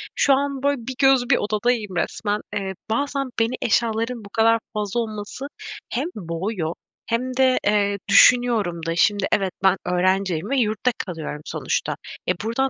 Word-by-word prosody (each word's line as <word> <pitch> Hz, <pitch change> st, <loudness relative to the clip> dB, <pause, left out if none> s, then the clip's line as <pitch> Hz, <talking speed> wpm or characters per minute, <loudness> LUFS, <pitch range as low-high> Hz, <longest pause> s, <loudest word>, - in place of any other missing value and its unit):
şu 275 Hz, -, +4 dB
an, 275 Hz, 0 st, -1 dB
böyle, 285 Hz, 0 st, +2 dB
bir 260 Hz, -, -4 dB
göz 270 Hz, -3 st, +4 dB
bir -, -, +5 dB
odadayım 215 Hz, -2 st, -1 dB
resmen. 205 Hz, +4 st, -1 dB
Eee, 195 Hz, -2 st, -2 dB, 0.2 s
bazen 275 Hz, +3 st, -1 dB
beni 230 Hz, +2 st, +1 dB
eşyaların 230 Hz, 0 st, 0 dB
bu 200 Hz, -, -11 dB
kadar 225 Hz, +2 st, +3 dB
fazla 210 Hz, +2 st, -2 dB
olması 215 Hz, +4 st, -5 dB, 0.4 s
hem 260 Hz, +5 st, -1 dB
boğuyor 170 Hz, -1 st, -3 dB, 0.3 s
hem 250 Hz, +3 st, -2 dB
de, 260 Hz, -1 st, +4 dB
eee, 205 Hz, -1 st, +2 dB
düşünüyorum 220 Hz, -9 st, +5 dB
da, 165 Hz, 0 st, -1 dB
şimdi, 200 Hz, +2 st, +2 dB
evet 195 Hz, -2 st, +1 dB
ben 190 Hz, 0 st, +4 dB
öğrenciyim 185 Hz, +1 st, +1 dB
ve 275 Hz, -, +1 dB
yurtta 220 Hz, +1 st, +1 dB
kalıyorum 160 Hz, -5 st, -5 dB
sonuçta. -, -, -2 dB, 0.3 s
E, -, -, +4 dB
buradan 250 Hz, +4 st, 0 dB
220 Hz, 155 wpm, -22 LUFS, 195-250 Hz, 0.4 s, bir